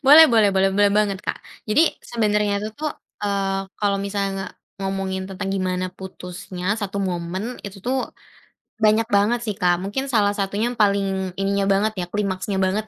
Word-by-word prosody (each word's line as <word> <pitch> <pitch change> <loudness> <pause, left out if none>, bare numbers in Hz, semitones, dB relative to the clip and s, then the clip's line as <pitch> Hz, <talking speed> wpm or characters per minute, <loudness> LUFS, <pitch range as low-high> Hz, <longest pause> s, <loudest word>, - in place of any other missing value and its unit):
Boleh 310 +4 +10
boleh 215 -3 +5
boleh 195 0 +3
boleh 205 0 +4
banget 200 -2 +2
Kak. - - -2 0.3
Jadi 280 +9 +5 0.2
sebenernya 210 -3 +1
itu 215 - -3
tu, 310 - -7 0.4
eee, 195 -1 0 0.2
kalau 200 -1 +1
misalnya 200 0 -1
nge 195 0 -4 0.4
ngomongin 195 -1 -2
tentang 195 +1 -4
gimana 185 -1 -1
putusnya 185 0 -5
satu 200 -2 -4
momen 185 +5 -3
itu 200 -1 -8
tu 240 +6 -4 0.9
banyak 220 +1 +4
banget 210 +4 +3
sih, 210 -3 -2
Kak. 175 -1 +4
Mungkin 265 +7 -2
salah 210 -4 +3
satunya 205 +4 -1
yang 245 - -11
paling 195 -2 +1
ininya 200 0 +1
banget 200 +2 +2
ya, 175 - -2
klimaksnya 195 -1 -2
banget 200 +3 0
200 Hz, 170 wpm, -22 LUFS, 190-210 Hz, 0.9 s, Boleh